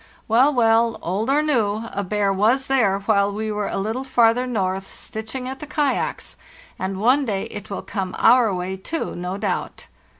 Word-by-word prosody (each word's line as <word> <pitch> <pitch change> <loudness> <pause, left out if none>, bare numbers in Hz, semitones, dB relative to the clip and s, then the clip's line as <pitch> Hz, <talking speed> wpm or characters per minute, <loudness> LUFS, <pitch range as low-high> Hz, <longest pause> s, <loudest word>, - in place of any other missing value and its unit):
Well, 250 +6 +4
well, 230 -3 +3
old 200 +8 -1
or 290 +2 +3
new, 225 -7 +1
a 200 - -2
bear 200 0 0
was 230 +7 +2
there 230 -8 +2
while 200 -1 +2
we 215 +1 -3
were 210 -1 -2
a - - -3
little 220 +6 -2
farther 245 -1 +3
north, 195 -5 -2
stitching 220 +4 -7
at 265 +1 -6
the 300 - -8
kayaks, 295 -2 -2 0.4
and 190 0 -3
one 255 +7 +3
day 205 -6 -2
it 210 +1 -8
will 200 - -5
come 190 -3 -4
our 240 -4 +5
way, 185 +1 -3
too, 320 - -4
no 180 +2 -4
doubt! 200 -3 -3
220 Hz, 180 wpm, -22 LUFS, 195-250 Hz, 0.4 s, our